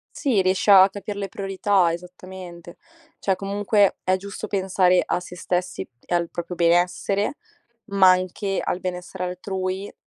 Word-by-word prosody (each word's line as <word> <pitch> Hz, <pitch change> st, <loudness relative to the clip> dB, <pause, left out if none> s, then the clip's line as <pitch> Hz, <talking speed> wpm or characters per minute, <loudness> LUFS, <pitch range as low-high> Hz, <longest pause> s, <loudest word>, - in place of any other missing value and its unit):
Sì, 250 Hz, -10 st, +1 dB
riesci 185 Hz, +2 st, 0 dB
a 195 Hz, -1 st, +8 dB
capir 200 Hz, +1 st, -6 dB
le 200 Hz, -1 st, -4 dB
priorità, 195 Hz, -1 st, +1 dB
esattamente. 180 Hz, 0 st, -9 dB, 0.4 s
Cioè, 195 Hz, -, +1 dB
comunque 200 Hz, +1 st, +1 dB
è 185 Hz, 0 st, +2 dB
giusto 200 Hz, +2 st, -7 dB
pensare 185 Hz, -2 st, +2 dB
a -, -, -1 dB
se 180 Hz, 0 st, -10 dB
stessi 180 Hz, +1 st, -3 dB, 0.2 s
e -, -, -3 dB
al 170 Hz, -1 st, +1 dB
proprio 175 Hz, +2 st, -6 dB
benessere, 180 Hz, -, +1 dB, 0.5 s
ma 195 Hz, -3 st, +6 dB
anche 185 Hz, +2 st, -1 dB
al 180 Hz, -, -2 dB
benessere 180 Hz, 0 st, -5 dB
altrui 185 Hz, +2 st, -4 dB
185 Hz, 145 wpm, -23 LUFS, 180-195 Hz, 0.5 s, a